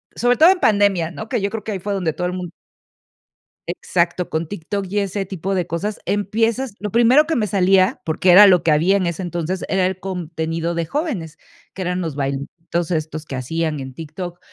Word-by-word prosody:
sobre 245 Hz, +1 st, +2 dB
todo 330 Hz, +4 st, +7 dB
en 380 Hz, -, -1 dB
pandemia, 200 Hz, -6 st, +3 dB
¿no?, 220 Hz, +5 st, -7 dB
que 215 Hz, -, -1 dB
yo 200 Hz, -, 0 dB
creo 215 Hz, -1 st, -6 dB
que 215 Hz, -, -3 dB
ahí 190 Hz, -, -3 dB
fue 200 Hz, +2 st, -3 dB
donde 175 Hz, -5 st, -1 dB
todo 180 Hz, 0 st, -2 dB
el 180 Hz, -, -3 dB
mun 180 Hz, -2 st, -5 dB, 1.2 s
Exacto, 175 Hz, 0 st, -1 dB
con 160 Hz, 0 st, -2 dB
TikTok 200 Hz, +2 st, -4 dB
y 205 Hz, +1 st, 0 dB
ese 200 Hz, 0 st, -2 dB
tipo 190 Hz, +1 st, -4 dB
de 180 Hz, -3 st, -1 dB
cosas, 200 Hz, +6 st, -3 dB
empiezas 225 Hz, +4 st, 0 dB
Lo 210 Hz, 0 st, -3 dB
primero 240 Hz, -, +5 dB
que 325 Hz, -, 0 dB
me 215 Hz, -3 st, 0 dB
salía, 190 Hz, 0 st, +3 dB
porque 170 Hz, +3 st, +2 dB
era 205 Hz, +3 st, +10 dB
lo 180 Hz, -3 st, +5 dB
que 160 Hz, -, +3 dB
había 170 Hz, +6 st, +3 dB
en 190 Hz, -2 st, +1 dB
ese 170 Hz, +2 st, -3 dB
entonces, 175 Hz, +1 st, -3 dB
era 190 Hz, -1 st, +1 dB
el 185 Hz, 0 st, -2 dB
contenido 165 Hz, -2 st, -3 dB
de 170 Hz, -1 st, -1 dB
jóvenes, 185 Hz, -, -3 dB, 0.4 s
que 190 Hz, -, -7 dB
eran 180 Hz, 0 st, -1 dB
los 160 Hz, -5 st, -3 dB
bailecitos 150 Hz, +5 st, -3 dB
estos 155 Hz, -1 st, -3 dB
que 135 Hz, -, -6 dB
hacían 155 Hz, +3 st, -2 dB
en 130 Hz, -1 st, -7 dB
TikTok, 170 Hz, +4 st, -7 dB
180 Hz, 210 wpm, -20 LUFS, 165-205 Hz, 1.2 s, era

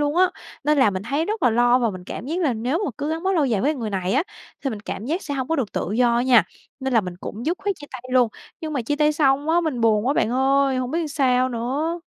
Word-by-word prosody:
luôn 295 Hz, +2 st, 0 dB
á. 370 Hz, 0 st, +4 dB, 0.3 s
Nên 300 Hz, -1 st, +3 dB
là 220 Hz, -6 st, +5 dB
mình 190 Hz, 0 st, -4 dB
thấy 280 Hz, +8 st, -1 dB
rất 430 Hz, +2 st, -3 dB
là 245 Hz, -, +5 dB
lo 240 Hz, +2 st, +4 dB
và 235 Hz, -3 st, +1 dB
mình 185 Hz, -1 st, -9 dB
cảm 225 Hz, -, -7 dB
giác 330 Hz, +4 st, -2 dB
là 290 Hz, -7 st, +2 dB
nếu 250 Hz, +9 st, -1 dB
mà -, -, -1 dB
cứ 295 Hz, +2 st, -2 dB
gắn 325 Hz, +1 st, -3 dB
bó 385 Hz, +1 st, +1 dB
lâu 320 Hz, -5 st, +2 dB
dài 220 Hz, -6 st, +1 dB
với 300 Hz, +3 st, +1 dB
người 225 Hz, -5 st, -4 dB
này 190 Hz, -1 st, -1 dB
á, 280 Hz, -, +3 dB, 0.4 s
thì 270 Hz, -, 0 dB
mình 210 Hz, -2 st, -6 dB
cảm 210 Hz, 0 st, -6 dB
giác 335 Hz, +6 st, -1 dB
sẽ 285 Hz, -2 st, -4 dB
hông 260 Hz, 0 st, -3 dB
có 325 Hz, -, +1 dB
được 245 Hz, -7 st, -2 dB
tự 195 Hz, -, -2 dB
do 235 Hz, 0 st, +3 dB
á 240 Hz, -, +2 dB
nha, 250 Hz, -3 st, +5 dB, 0.4 s
nên 265 Hz, -1 st, -2 dB
là 225 Hz, -, +6 dB
mình 180 Hz, -3 st, -7 dB
cũng 230 Hz, +7 st, -6 dB
dứt 345 Hz, +3 st, 0 dB
khoát 400 Hz, -1 st, -1 dB
chia 290 Hz, -, -11 dB
tay 255 Hz, -1 st, -7 dB
luôn, 250 Hz, -3 st, +4 dB, 0.3 s
nhưng 315 Hz, -1 st, -4 dB
mà 270 Hz, -5 st, -1 dB
chia 290 Hz, +6 st, -1 dB
tay 300 Hz, 0 st, +3 dB
xong 285 Hz, 0 st, +2 dB
á, 345 Hz, +1 st, +4 dB
mình 300 Hz, -8 st, -2 dB
buồn 220 Hz, 0 st, +3 dB
quá 280 Hz, -, +2 dB
bạn 220 Hz, -, +1 dB
ơi, 270 Hz, +1 st, +2 dB
hổng 255 Hz, 0 st, -2 dB
biết 330 Hz, -, 0 dB
làm 320 Hz, -, -3 dB
sao 255 Hz, -3 st, +2 dB
nữa. 275 Hz, +8 st, -2 dB
265 Hz, 305 wpm, -23 LUFS, 235-305 Hz, 0.4 s, là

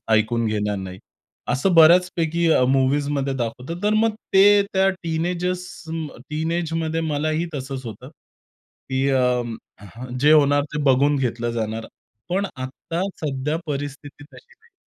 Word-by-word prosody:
ऐकून 115 Hz, +1 st, +2 dB
घेणार 105 Hz, -1 st, -1 dB
नाही. 95 Hz, -1 st, -7 dB, 0.5 s
असं 140 Hz, +9 st, +1 dB
बऱ्याचपैकी 170 Hz, 0 st, +4 dB
अ, 125 Hz, -, +4 dB
मूव्हीजमध्ये 135 Hz, +1 st, +1 dB
दाखवत. 125 Hz, +3 st, -4 dB
तर 210 Hz, +1 st, +2 dB
मग 220 Hz, 0 st, +2 dB, 0.2 s
ते 200 Hz, +1 st, +7 dB
त्या 190 Hz, 0 st, +3 dB
टीनेजर्स 175 Hz, +2 st, -2 dB, 0.7 s
टीनेजमध्ये 165 Hz, 0 st, -1 dB
मलाही 155 Hz, +1 st, -1 dB
तसंच 135 Hz, -1 st, -5 dB
होतं. 115 Hz, +3 st, -9 dB, 0.8 s
की 130 Hz, +1 st, +1 dB
अ, 125 Hz, -2 st, +2 dB, 0.8 s
जे 150 Hz, +1 st, +5 dB
होणार 145 Hz, -2 st, +5 dB
ते 150 Hz, -, -1 dB
बघून 140 Hz, +1 st, +3 dB
घेतलं 120 Hz, -3 st, -1 dB
जाणार. 110 Hz, -1 st, -3 dB, 0.4 s
पण 195 Hz, +3 st, 0 dB
आत्ता 130 Hz, +6 st, -5 dB, 0.2 s
सध्या 150 Hz, +1 st, -1 dB
परिस्थिती 145 Hz, 0 st, -6 dB
तशी 475 Hz, 0 st, -17 dB
नाही. 465 Hz, 0 st, -31 dB
145 Hz, 125 wpm, -22 LUFS, 130-170 Hz, 0.8 s, ते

